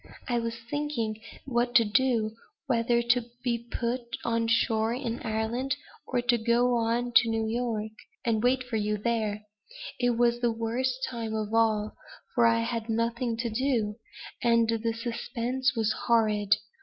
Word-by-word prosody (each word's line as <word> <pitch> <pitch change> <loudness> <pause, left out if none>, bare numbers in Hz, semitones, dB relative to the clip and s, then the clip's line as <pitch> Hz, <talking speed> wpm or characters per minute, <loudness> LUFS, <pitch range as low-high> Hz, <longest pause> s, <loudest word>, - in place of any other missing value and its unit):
I 240 -2 +1
was 230 0 -3
thinking 235 -7 -2 0.2
what 240 -1 0
to 230 -3 +7
do; 225 -1 +1 0.3
whether 235 -2 +2
to 240 0 +2 0.2
be 235 -1 -1
put 240 +2 -1 0.2
on 230 -1 +1
shore 225 0 +2
in 245 -2 -3
Ireland, 230 +5 -1 0.3
or 245 -2 0
to 245 -1 +3
go 240 +2 +3
on 235 +1 0
to 230 0 +4
New 225 0 0
York, 220 -2 -2 0.3
and 225 -2 +2
wait 255 +2 +2
for 245 -3 -3
you 210 0 0
there; 215 -1 -1 0.6
it 245 -1 +2
was 240 0 +3
the 240 -1 +2
worst 250 +3 -1
time 230 -3 -4
of 215 0 -3
all, 220 -2 +2 0.4
for 235 -2 +5
I 230 0 +3
had 230 -1 -3
nothing 230 +1 0
to 235 0 -2
do; 225 -3 0 0.4
and 230 -1 +4
the 230 0 0
suspense 245 +3 -2
was 220 -2 +1 0.2
horrible. 215 -3 +2
230 Hz, 155 wpm, -28 LUFS, 225-245 Hz, 0.6 s, to